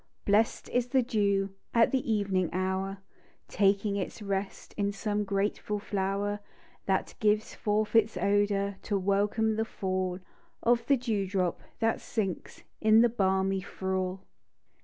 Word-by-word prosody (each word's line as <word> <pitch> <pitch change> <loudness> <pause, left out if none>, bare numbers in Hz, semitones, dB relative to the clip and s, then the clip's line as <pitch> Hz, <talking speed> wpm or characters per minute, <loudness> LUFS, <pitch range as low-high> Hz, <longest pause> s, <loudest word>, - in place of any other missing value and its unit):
Blest 210 +2 +2
is 245 0 +1
the 260 0 +2
dew 200 -4 +1 0.2
At 230 -1 +5
the 260 -3 0
evening 195 -4 +1
hour, 190 +2 -1 0.5
Taking 200 +1 +2
its 190 - -4
rest 195 -1 -4
In 200 -1 0
some 210 +1 -1
grateful 205 +1 -1
flower, 200 0 -2 0.5
That 190 -1 0
gives 210 0 +2
forth 215 +1 -1
its 225 -3 +4
odour, 200 +1 +1
To 205 - -1
welcome 205 +3 +1
the 220 - +2
fall 185 -3 -2 0.5
Of 235 0 +2
the 275 - +5
dew 220 -6 -1
drop 185 -3 -1 0.2
that 225 0 +1
sinks 195 -6 -4 0.2
In 220 +1 +6
the 240 - +5
balmy 190 -3 +1
thrall. 190 0 -3
200 Hz, 140 wpm, -29 LUFS, 195-215 Hz, 0.5 s, In